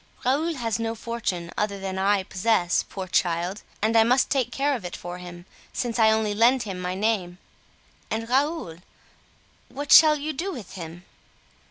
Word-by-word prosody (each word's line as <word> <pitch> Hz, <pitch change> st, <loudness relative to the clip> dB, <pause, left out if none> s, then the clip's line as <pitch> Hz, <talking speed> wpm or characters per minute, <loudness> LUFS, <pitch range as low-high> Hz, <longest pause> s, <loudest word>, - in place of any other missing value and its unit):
Raoul 310 Hz, +6 st, +1 dB
has 230 Hz, -4 st, -2 dB
no 225 Hz, 0 st, -2 dB
fortune 215 Hz, -7 st, -4 dB
other 200 Hz, -1 st, -1 dB
than 190 Hz, -1 st, -4 dB
I 195 Hz, 0 st, +2 dB
possess, 185 Hz, -2 st, +1 dB
poor 190 Hz, -1 st, -5 dB
child! 175 Hz, +2 st, 0 dB, 0.2 s
and 220 Hz, +1 st, +2 dB
I 225 Hz, -, +7 dB
must 250 Hz, +3 st, +2 dB
take 255 Hz, -4 st, +1 dB
care 280 Hz, +3 st, 0 dB
of 230 Hz, -, -6 dB
it 175 Hz, -, -6 dB
for 175 Hz, +1 st, -7 dB
him, 175 Hz, -1 st, -10 dB, 0.3 s
since 240 Hz, -1 st, -2 dB
I 220 Hz, -1 st, +6 dB
only 220 Hz, -1 st, +1 dB
lend 235 Hz, +4 st, +4 dB
him 195 Hz, -4 st, -6 dB
my 180 Hz, 0 st, -3 dB
name." 190 Hz, -4 st, -1 dB, 0.7 s
"And 225 Hz, +1 st, -3 dB
Raoul—what 275 Hz, -, -5 dB
shall 310 Hz, -1 st, +9 dB
you 305 Hz, +2 st, -4 dB
do 360 Hz, +8 st, -3 dB
with 235 Hz, -, -8 dB
him?" 175 Hz, -1 st, -9 dB
220 Hz, 170 wpm, -25 LUFS, 180-250 Hz, 0.7 s, shall